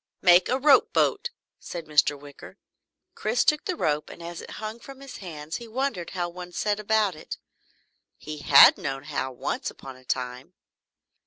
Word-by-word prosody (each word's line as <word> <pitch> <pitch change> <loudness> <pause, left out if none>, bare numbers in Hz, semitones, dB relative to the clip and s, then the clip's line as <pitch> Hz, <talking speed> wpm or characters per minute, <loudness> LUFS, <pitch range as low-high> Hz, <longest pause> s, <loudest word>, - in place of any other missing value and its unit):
"Make 180 0 +6
a 255 - +2
rope 280 +1 +4
boat!" - - +1 0.3
said 170 -2 -7
Mr. 145 -1 +2
Wicker. 145 0 -13 0.6
Chris 485 - 0
took 300 -1 +2
the 370 - -2
rope 150 - -1
and 170 - -11
as 170 0 -7
it - - -11
hung 215 +2 -6
from 270 +2 -12
his 275 -1 -10
hands 160 -4 -7
he 235 - -10
wondered 230 -7 -3
how 175 -1 0
one 180 0 -9
set 210 +2 -1
about 210 -2 +1
it 155 - -8 0.8
he 155 0 -8
had 140 -1 +8
known 135 -1 -4
how, 145 -3 -3
once 125 - -3
upon 135 -1 -11
a 130 - -19
time. 125 0 -4
175 Hz, 175 wpm, -26 LUFS, 145-220 Hz, 0.8 s, had